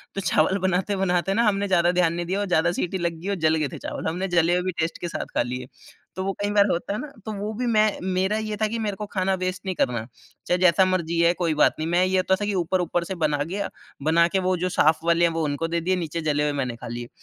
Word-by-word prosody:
तो 195 Hz, -, -2 dB
चावल 175 Hz, +2 st, +2 dB
बनाते-बनाते 190 Hz, 0 st, 0 dB
न 225 Hz, -, 0 dB
हमने 200 Hz, 0 st, -1 dB
ज़्यादा 175 Hz, -2 st, +3 dB
ध्यान 175 Hz, -2 st, +2 dB
नहीं 175 Hz, 0 st, -3 dB
दिया 190 Hz, +4 st, -1 dB
और 205 Hz, -, 0 dB
ज़्यादा 175 Hz, -1 st, +2 dB
सीटी 180 Hz, +2 st, -2 dB
लग 170 Hz, -2 st, -2 dB
गई 195 Hz, -, -4 dB
और 200 Hz, -, 0 dB
जल 155 Hz, -, +3 dB
गए 155 Hz, -2 st, 0 dB
थे -, -, -5 dB
चावल। -, -, -5 dB
हमने 180 Hz, +4 st, -2 dB
जले 175 Hz, -1 st, +3 dB
हुए 180 Hz, -, +2 dB
भी 185 Hz, -, -1 dB
टेस्ट 160 Hz, +1 st, -1 dB
के 175 Hz, -, -2 dB
साथ -, -, -4 dB
खा -, -, +3 dB
लिए। 125 Hz, +1 st, -5 dB, 0.5 s
तो 190 Hz, -, -2 dB
वो 195 Hz, -, -1 dB
कई 205 Hz, -, 0 dB
बार 205 Hz, -1 st, +5 dB
होता 175 Hz, +4 st, -2 dB
है 210 Hz, -, -3 dB
ना? 300 Hz, -, -5 dB, 0.2 s
तो 220 Hz, -, -4 dB
वो 210 Hz, +2 st, -3 dB
भी 245 Hz, +3 st, -3 dB
मैं 215 Hz, -2 st, +2 dB
मेरा 190 Hz, +3 st, 0 dB
ये 215 Hz, -1 st, -4 dB
था 215 Hz, 0 st, +1 dB
कि 230 Hz, -, -3 dB
मेरे 205 Hz, -3 st, -2 dB
को 210 Hz, -, -4 dB
खाना 190 Hz, 0 st, +1 dB
वेस्ट 185 Hz, +1 st, -3 dB
नहीं 185 Hz, -, -2 dB
करना। 120 Hz, -7 st, 0 dB, 0.4 s
चाहे 180 Hz, -, +2 dB
जैसा 185 Hz, +1 st, +5 dB
मर्ज़ी 170 Hz, -3 st, 0 dB
है 170 Hz, +1 st, +4 dB
कोई 170 Hz, -3 st, 0 dB
बात 150 Hz, -, +4 dB
नहीं। 160 Hz, -, -2 dB
मैं 175 Hz, +2 st, +3 dB
ये 185 Hz, 0 st, +1 dB
होता 190 Hz, +1 st, +2 dB
था -, -, 0 dB
कि 210 Hz, -, -1 dB
ऊपर-ऊपर 175 Hz, 0 st, 0 dB
से 190 Hz, -, -4 dB
बना 150 Hz, -1 st, +1 dB
गया 195 Hz, +6 st, -3 dB, 0.3 s
बना 170 Hz, +2 st, +4 dB
के 190 Hz, -, 0 dB
वो 185 Hz, -, +2 dB
जो 180 Hz, +2 st, -1 dB
साफ़ 155 Hz, -2 st, +3 dB
वाले 170 Hz, 0 st, +4 dB
हैं 170 Hz, -, +2 dB
वो 165 Hz, -1 st, -1 dB
उनको 145 Hz, +3 st, -2 dB
दे 170 Hz, 0 st, -1 dB
दिए, 185 Hz, +2 st, +1 dB
नीचे 165 Hz, -1 st, -3 dB
जले 150 Hz, -1 st, +1 dB
हुए 150 Hz, -, +1 dB
मैंने 125 Hz, -2 st, -3 dB
खा 125 Hz, -, -9 dB
लिए। 120 Hz, +1 st, -6 dB
180 Hz, 285 wpm, -24 LUFS, 165-195 Hz, 0.5 s, बार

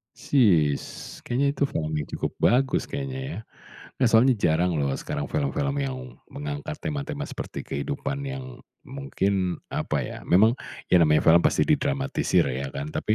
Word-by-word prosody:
Sis, 85 Hz, -, +3 dB, 0.4 s
kayaknya 130 Hz, +4 st, +1 dB
itu 140 Hz, -, 0 dB
film 80 Hz, -, -1 dB
yang 75 Hz, -, -1 dB
cukup -, -, -3 dB
bagus 130 Hz, +2 st, +2 dB
kayaknya, 135 Hz, -1 st, -5 dB
ya? -, -, -6 dB, 0.6 s
Nggak, 125 Hz, -, +2 dB
soalnya 125 Hz, +3 st, +6 dB
jarang 85 Hz, -3 st, +1 dB
loh, 70 Hz, -3 st, 0 dB
sekarang 70 Hz, -, -4 dB
film-film 140 Hz, -1 st, -1 dB
yang 130 Hz, -2 st, -4 dB
mengangkat 145 Hz, +2 st, -5 dB
tema-tema 145 Hz, -1 st, -3 dB
seperti 145 Hz, -, -6 dB
kehidupan 140 Hz, -, -4 dB
yang 130 Hz, -2 st, -6 dB, 0.2 s
mungkin, 100 Hz, -, -2 dB
apa -, -, -1 dB
ya, -, -, -6 dB
memang, 110 Hz, +7 st, +5 dB, 0.3 s
ya 90 Hz, -, +7 dB
namanya 75 Hz, -2 st, +4 dB
film 85 Hz, +1 st, +7 dB
pasti -, -, +2 dB
didramatisir 140 Hz, -, +1 dB
ya, 65 Hz, +2 st, -3 dB
kan? 70 Hz, +2 st, -4 dB
Tapi, 110 Hz, -, 0 dB
130 Hz, 150 wpm, -25 LUFS, 85-140 Hz, 0.6 s, ya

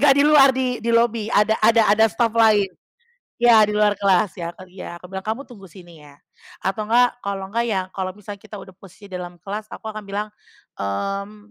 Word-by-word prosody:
nggak 280 Hz, -2 st, +6 dB
di 285 Hz, -, +4 dB
luar, 295 Hz, -2 st, +7 dB
di 250 Hz, -2 st, -1 dB
di 230 Hz, -, -4 dB
lobi 230 Hz, -2 st, +1 dB
ada 210 Hz, -1 st, +3 dB
ada 225 Hz, +1 st, +5 dB
ada 220 Hz, +1 st, +4 dB
staff 225 Hz, +1 st, 0 dB
lain. 220 Hz, -3 st, +4 dB, 0.8 s
Ya, 235 Hz, -2 st, +7 dB
di 210 Hz, -, -3 dB
luar 210 Hz, -1 st, +2 dB
kelas 200 Hz, -1 st, +2 dB
ya, 170 Hz, 0 st, -5 dB
kan 185 Hz, -1 st, -14 dB
iya. 185 Hz, -2 st, -9 dB
Aku 180 Hz, -, -12 dB
bilang, 190 Hz, +1 st, -7 dB
"Kamu 225 Hz, +5 st, -3 dB
tunggu 215 Hz, -7 st, -14 dB
sini 175 Hz, -2 st, -15 dB
ya!" 145 Hz, -, -16 dB, 0.5 s
atau 195 Hz, +3 st, -2 dB
nggak 245 Hz, +2 st, +2 dB
kalau 195 Hz, -1 st, -4 dB
nggak, 235 Hz, +3 st, 0 dB
ya 195 Hz, -4 st, 0 dB
kalau 185 Hz, -1 st, -5 dB
misalnya 205 Hz, 0 st, -10 dB
kita 210 Hz, -, -13 dB
udah 190 Hz, -, -12 dB
posisi 195 Hz, +1 st, -16 dB
dalam 180 Hz, -1 st, -7 dB
kelas 210 Hz, +2 st, -6 dB
aku -, -, -9 dB
akan 215 Hz, -1 st, -8 dB
bilang, 205 Hz, +2 st, -4 dB, 0.5 s
mmm, 200 Hz, -, -4 dB
210 Hz, 210 wpm, -21 LUFS, 190-230 Hz, 0.8 s, luar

